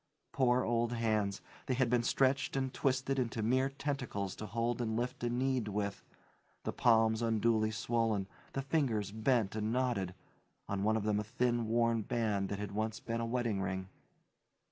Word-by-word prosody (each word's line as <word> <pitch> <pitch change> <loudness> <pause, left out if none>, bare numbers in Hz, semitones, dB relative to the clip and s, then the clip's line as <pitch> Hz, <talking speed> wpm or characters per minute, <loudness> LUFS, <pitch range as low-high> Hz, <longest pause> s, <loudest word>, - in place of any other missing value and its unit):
Poor 130 -4 +3
old 120 0 +1
hands! 110 -4 0 0.3
They 130 - +1
had 130 0 +2
been 120 0 +3
stretched 135 +3 +2
and 135 -1 -1
twisted 135 0 0
into 115 -3 -1
mere 130 +4 +2
tentacles 135 -9 -3
to 110 - -5
hold 115 +3 -1
and 110 -1 -1
lift 120 0 -3
and 120 0 0
knead 130 -3 +1
with; 100 -1 -2 0.6
the - - -2
palms 110 -1 +4
unduly 110 -1 +2
swollen, 110 -2 0 0.3
the 135 - -2
fingers 125 - 0
bent 110 -1 +1
and 110 0 -1
knotted 115 -8 0 0.5
on 100 -1 -2
one 110 +2 +2
of 110 - -2
them 105 -1 +1
a - - -1
thin, 120 +1 0
worn 115 0 +2
band 105 -4 0
that 100 - -2
had 105 0 -4
once 110 +2 -2
been 115 -1 -3
a 115 - -1
wedding 115 -4 0
ring. 95 0 -3
115 Hz, 175 wpm, -34 LUFS, 105-125 Hz, 0.6 s, palms